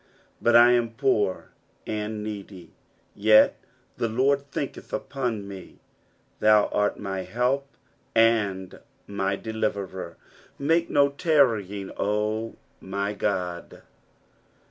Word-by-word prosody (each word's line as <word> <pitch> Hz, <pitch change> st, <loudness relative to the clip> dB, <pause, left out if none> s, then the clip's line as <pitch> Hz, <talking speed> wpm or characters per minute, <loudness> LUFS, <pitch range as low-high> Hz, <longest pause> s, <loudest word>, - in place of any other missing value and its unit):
17 -, -, -36 dB
But 120 Hz, 0 st, +3 dB
I 120 Hz, +1 st, +8 dB
am 120 Hz, -2 st, +1 dB
poor 115 Hz, -8 st, 0 dB, 0.3 s
and 105 Hz, 0 st, -4 dB
needy; 100 Hz, -5 st, -8 dB, 0.4 s
yet 110 Hz, +1 st, +5 dB, 0.4 s
the 115 Hz, -, -1 dB
Lord 140 Hz, +4 st, +1 dB
thinketh 140 Hz, -, -5 dB
upon 120 Hz, -7 st, -3 dB
me: 95 Hz, -2 st, -10 dB, 0.6 s
thou 105 Hz, -1 st, +5 dB
art 105 Hz, 0 st, 0 dB
my 95 Hz, -2 st, -4 dB
help 125 Hz, +8 st, -1 dB, 0.5 s
and 105 Hz, -5 st, +2 dB, 0.3 s
my 100 Hz, -1 st, -1 dB
deliverer; 100 Hz, -5 st, -4 dB, 0.4 s
make 165 Hz, +4 st, +1 dB
no 140 Hz, -1 st, +4 dB
tarrying, 115 Hz, -, +1 dB
O 105 Hz, +2 st, -1 dB, 0.2 s
my 100 Hz, +2 st, -3 dB
God. 90 Hz, -4 st, -3 dB
110 Hz, 105 wpm, -25 LUFS, 100-120 Hz, 0.6 s, I